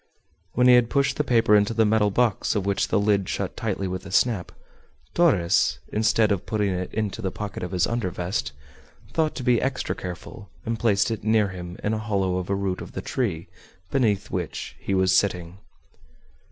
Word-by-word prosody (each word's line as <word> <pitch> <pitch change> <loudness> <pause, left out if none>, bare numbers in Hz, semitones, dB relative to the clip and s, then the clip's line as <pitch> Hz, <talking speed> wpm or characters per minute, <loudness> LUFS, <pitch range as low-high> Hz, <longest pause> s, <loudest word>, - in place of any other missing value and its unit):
When 125 - +3
he 125 - +8
had 120 -1 +5
pushed 140 0 +1
the 150 - +2
paper 115 -5 +4
into 105 +2 +2
the 110 0 +4
metal 105 -1 +3
box, 115 +1 +1
of 100 -2 -1
which 100 -1 +1
the - - +2
lid 100 -2 +1
shut - - -3
tightly 95 - -2
with 95 0 -4
a - - -10
snap, 105 -2 +1 0.6
Torres, 130 - +3 0.2
instead 110 0 +3
of 100 -3 -1
putting 105 -2 0
it 90 0 -3
into 110 0 -3
the 95 - -1
pocket 105 +2 -6
of 90 - -3
his 90 -1 +1
under 115 -5 -1
vest, 90 0 -3 0.6
thought 160 -1 +1
to 130 - -5
be 120 -1 +3
extra 135 0 -1
careful, 90 +3 -8 0.2
and 115 0 -2
placed 110 0 +2
it 110 - -4
near 110 -1 +3
him 90 -1 -8
in 105 - 0
a 110 - -1
hollow 100 -4 0
of 90 0 -4
a 100 - +1
root 95 -2 -2
of - - -9
the - - -4
tree 95 -11 -2 0.4
beneath 110 -7 +1
which - - -4
he 100 - -2
was 95 0 +3
sitting. 90 -2 0
105 Hz, 200 wpm, -24 LUFS, 95-115 Hz, 0.6 s, he